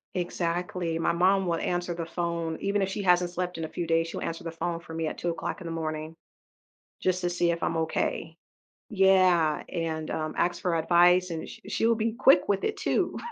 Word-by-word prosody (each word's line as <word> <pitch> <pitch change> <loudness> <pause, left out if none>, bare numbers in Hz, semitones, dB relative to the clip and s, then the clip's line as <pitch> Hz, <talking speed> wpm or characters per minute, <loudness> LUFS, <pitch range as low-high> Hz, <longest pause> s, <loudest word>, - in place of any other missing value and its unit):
Exactly, 175 -1 -2
my - - +2
mom 185 +2 +3
will 170 - +1
answer 175 0 -2
the 165 -1 -4
phone, 170 -1 -3
even 200 0 +1
if 195 - -1
she 200 - -3
hasn't 180 -2 +3
slept 180 0 -3
in 165 - -4
a - - -7
few 175 0 -4
days, 165 0 +2
she'll - - -6
answer 165 0 -4
the 165 - -4
phone 165 +1 -3
for 165 -1 -11
me 160 0 -2
at - - -5
2:00 170 +2 -3
in 185 - -10
the 165 - -4
morning, 155 0 -4 0.9
just 185 -1 +1
to 175 - 0
see 175 -1 +1
if 170 0 -3
I'm 165 - 0
okay. 160 0 -2 0.5
Yeah, 185 -6 +4
and, 160 -2 -3
um, 155 0 -3
ask 175 0 0
for 180 -3 0
advice 175 +2 +4
and 165 -1 -5
she - - -11
she 225 - 0
will 230 - +4
be 225 0 -1
quick 235 -6 +4
with 200 -1 +1
it 430 - -1
too. - - 0
175 Hz, 215 wpm, -27 LUFS, 165-180 Hz, 0.9 s, Yeah